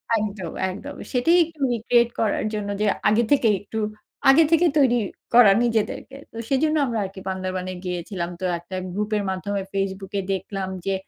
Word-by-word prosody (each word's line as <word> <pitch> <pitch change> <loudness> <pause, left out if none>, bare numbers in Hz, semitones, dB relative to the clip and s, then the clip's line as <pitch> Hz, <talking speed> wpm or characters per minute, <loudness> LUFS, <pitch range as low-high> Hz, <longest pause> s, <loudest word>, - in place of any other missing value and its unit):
একদম, 210 -4 -3 0.2
একদম 280 +10 -7 0.2
সেটাই 310 +8 +3
একটু 320 -2 -16
রিক্রিয়েট 235 +1 +2
করার 215 -1 +1
জন্য, 210 -1 -3
যে - - +2 0.2
আগে 225 +3 +3
থেকেই 230 -7 +4
একটু 220 +2 -5 0.5
আগে 305 +5 +7
থেকেই 330 0 +4
তৈরি 245 -3 +4 0.4
করা 235 -4 +8
নিজেদেরকে। 235 +3 -1 0.2
তো 225 - -11
সেজন্য 305 +3 +2
আমরা 235 -4 -2
আরকি 190 0 -9
বান্দরবনে 185 -1 -3
গিয়েছিলাম। 180 0 -3
তো 185 - -1
একটা 185 +2 -9 0.2
গ্রুপের 210 +1 -1
মাধ্যমে 195 +1 -2
Facebook 195 0 -3
এ - - 0
দেখলাম 190 0 -4 0.2
যে 195 - +1
210 Hz, 165 wpm, -23 LUFS, 190-245 Hz, 0.5 s, করা